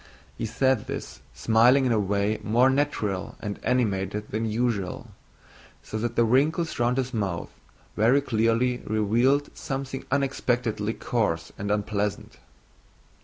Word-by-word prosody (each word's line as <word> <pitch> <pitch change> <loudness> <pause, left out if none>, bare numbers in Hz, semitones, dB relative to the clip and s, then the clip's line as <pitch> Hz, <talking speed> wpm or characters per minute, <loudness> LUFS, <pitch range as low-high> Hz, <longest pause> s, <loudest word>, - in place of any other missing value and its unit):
He 115 - -3
said 130 +1 +1
this - - -6
smiling 120 +4 +4
in 125 - +2
a 110 - +3
way 100 +2 0
more 120 +5 +3
natural 110 -9 -1
and 105 -2 -5
animated 105 -4 -1
than 110 +1 -1
usual, 110 -4 -2 0.7
so 110 - -5
that 120 +1 -2
the 120 - +4
wrinkles 150 +8 +1
round 120 +1 +2
his 130 0 -1
mouth 100 -7 -2 0.4
very 120 +6 +4
clearly 115 0 +1
revealed 120 +7 +1
something 135 -1 -4
unexpectedly 125 -5 0
coarse 85 -9 -1
and 100 +1 -5
unpleasant. 105 0 -2
115 Hz, 125 wpm, -26 LUFS, 105-130 Hz, 0.7 s, smiling